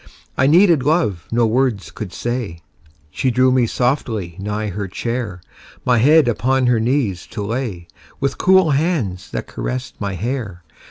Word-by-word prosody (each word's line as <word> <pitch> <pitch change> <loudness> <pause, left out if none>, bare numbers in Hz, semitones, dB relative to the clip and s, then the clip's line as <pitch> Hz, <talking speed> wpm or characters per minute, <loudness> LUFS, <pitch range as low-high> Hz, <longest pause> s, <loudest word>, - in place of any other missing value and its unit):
I 130 - +3
needed 170 -1 +5
love 140 - 0
no 120 0 +3
words 115 -2 0
could 105 -5 -7
say; 115 -9 -4 0.5
She 130 - 0
drew 130 +1 +3
me 125 -2 +3
softly 115 - -1
nigh 105 +2 -3
her 100 +1 -4
chair, 110 -2 -4 0.4
My 125 -2 +3
head 150 +3 +5
upon 130 +3 +1
her 120 -2 +3
knees 110 -6 0
to 105 - -5
lay, 105 -6 -4 0.3
With 135 -1 -2
cool 190 -3 +5
hands 135 - -1
that - - -4
caressed 130 -2 -5
my 100 -1 -2
hair. 105 -3 -4
120 Hz, 155 wpm, -19 LUFS, 100-135 Hz, 0.5 s, needed